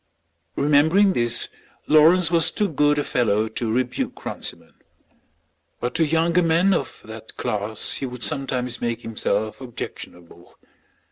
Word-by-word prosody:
Remembering 160 +8 +3
this 120 -3 +2 0.4
Lawrence 165 +3 +5
was 165 -3 +4
too 210 - 0
good 150 -3 +2
a 145 - +1
fellow 110 -5 +1
to 110 +1 -3
rebuke 125 +1 -2
Runciman; - - -6 1.1
but 120 - -3
to 165 - +2
younger 165 +3 +2
men 170 +4 +3
of - - -3
that 110 0 -11
class 105 +1 -1
he 135 - -3
would 125 -1 -7
sometimes 130 -4 -1
make 120 0 -2
himself 110 0 -2
objectionable. 90 -8 -9
130 Hz, 130 wpm, -22 LUFS, 115-160 Hz, 1.1 s, Lawrence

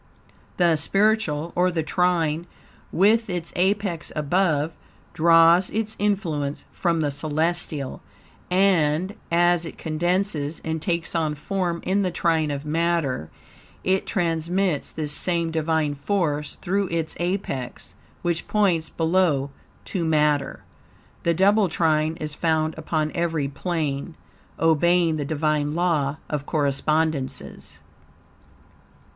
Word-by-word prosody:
The 170 -3 +3
spiritual, 180 -2 +1
or 180 +1 +3
the 165 -3 -1
trine 170 -1 0 0.4
with 215 +4 +3
its 175 -2 -3
apex 190 -2 0
above, 155 0 +1 0.4
draws 165 +2 +5
its 220 0 -1
influence 165 -9 -1
from 170 -3 0
the 145 -2 0
celestial, 155 0 -1 0.5
and 180 -1 +2 0.2
as 175 0 +3
it 165 - -7
condenses 165 -1 -1
and 160 0 -2
takes 170 -1 -1
on 160 -3 0
form 175 +2 -2
in 195 +2 +1
the 185 - +1
trine 165 -3 +1
of 140 0 -4
matter, 160 - 0 0.5
it 190 +1 +1
transmits 175 -2 0
this 150 -2 -1
same 170 +1 +1
Divine 160 -2 0
force 150 -2 -1
through 195 +2 0
its 165 -2 -2
apex, 175 -8 -3 0.3
which 170 -1 -1
points 185 -7 +1
below, 160 -5 +1 0.3
to 180 - -2
matter. 150 -2 +1 0.6
The 170 0 +1
double 200 +2 +4
trine 160 -1 +1
is 155 -1 -4
found 160 0 0
upon 155 -1 -2
every 165 -4 -1
plane, 155 0 -3 0.4
obeying 165 +1 +3
the 145 - -2
Divine 150 0 0
Law 155 -5 +1
of 145 -2 -4
Correspondences. 150 0 -1
165 Hz, 115 wpm, -24 LUFS, 150-180 Hz, 0.6 s, draws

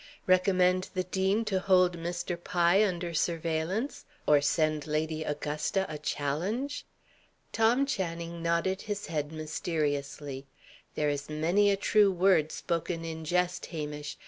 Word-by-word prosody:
"Recommend 185 0 +3
the 185 - +1
dean 190 +4 0
to 195 -3 0
hold 185 -2 +4
Mr. 175 +1 -4
Pye 175 +3 +3
under 175 -4 -1
surveillance? 165 - -1 0.2
Or 145 -1 +5
send 155 0 +1
Lady 155 +1 -1
Augusta 150 +5 -1
a 150 -1 -6
challenge?" 190 - -2 0.6
Tom 235 +5 +3
Channing 170 -8 -3
nodded 170 +3 0
his 205 -1 -4
head 150 -2 -3
mysteriously. 145 -3 -3 0.5
"There 150 -1 +1
is 145 0 -4
many 170 +7 +2
a 200 - +2
true 205 0 +4
word 180 -4 +3
spoken 165 0 -3
in 160 -1 -5
jest, 180 +2 0
Hamish. 150 -2 -5
170 Hz, 130 wpm, -29 LUFS, 155-190 Hz, 0.6 s, Or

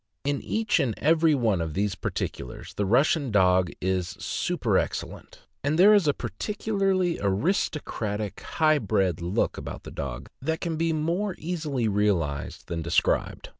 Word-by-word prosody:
In 140 0 -1
each 220 -4 0
and 130 -7 0
every 160 0 +4
one 110 -9 +1
of 80 -2 -4
these 100 +1 0
particulars, 60 - -5
the 100 - -1
Russian 140 - +3
dog 95 -3 +4
is 90 -1 -1
superexcellent; - - -2 0.3
and 145 +3 +1
there 200 +4 +8
is 200 -6 +4
a 145 - +4
peculiarly 195 -4 -1
aristocratic, 105 - -1
high 155 -2 +2
bred 95 - 0
look 85 +4 0
about - - -7
the - - -9
dog 65 -1 -5
that 160 +4 -1
can 165 -2 -2
be 165 +1 +1
more 170 +6 -1
easily 155 -8 -2
realized 95 -9 -1
than 85 -1 -3
described. 85 +1 0
130 Hz, 145 wpm, -26 LUFS, -, 0.3 s, there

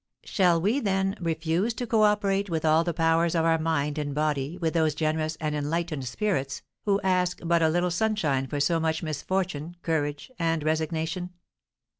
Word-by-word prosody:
Shall 175 -4 +2
we, 210 +11 +1
then, 195 -4 0
refuse 165 +6 -1
to 245 - -3
cooperate 210 -3 +2
with 160 -2 -1
all 160 +1 +4
the 170 - -1
powers 165 +1 +2
of 165 -1 +2
our 165 -1 +3
mind 150 -2 0
and 145 -1 -3
body 150 +1 -1
with 165 -3 -1
those 160 -3 +2
generous 155 0 -1
and 155 -1 -2
enlightened 150 -1 -2
spirits, 135 - -2 0.2
who 200 -1 +2
ask 180 -1 +1
but 170 0 +3
a 160 - +4
little 175 +2 +1
sunshine 175 -9 0
for 145 +2 -3
so 165 +3 +2
much 160 0 -1
misfortune, 165 +1 -2
courage, 150 - -2
and 165 -2 0
resignation? 160 +3 -1
165 Hz, 170 wpm, -27 LUFS, 155-180 Hz, 0.2 s, all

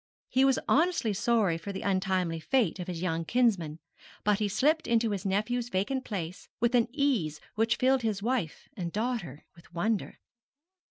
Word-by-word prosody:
He 260 - +3
was 270 -1 +4
honestly 320 - +2
sorry 205 -5 +2
for 200 +4 -6
the 190 - -5
untimely 185 -4 0
fate 220 -1 +1
of 180 - -5
his 175 -1 -4
young 165 -2 0
kinsmen; 195 -8 +1 0.5
but 210 -1 +2
he 210 - +1
slipped 300 - +2
into 230 -1 +2
his 200 -1 -2
nephew's 230 +5 0
vacant 245 +7 -1
place 180 -4 -5
with 235 +2 +2
an 240 -2 +4
ease 245 - 0
which 225 +2 +2
filled 260 0 +3
his 210 -3 -1
wife 230 -9 -2
and 175 -4 -4
daughter 215 - -3
with 170 +1 -19
wonder. 210 +5 -1
210 Hz, 170 wpm, -29 LUFS, 180-245 Hz, 0.5 s, was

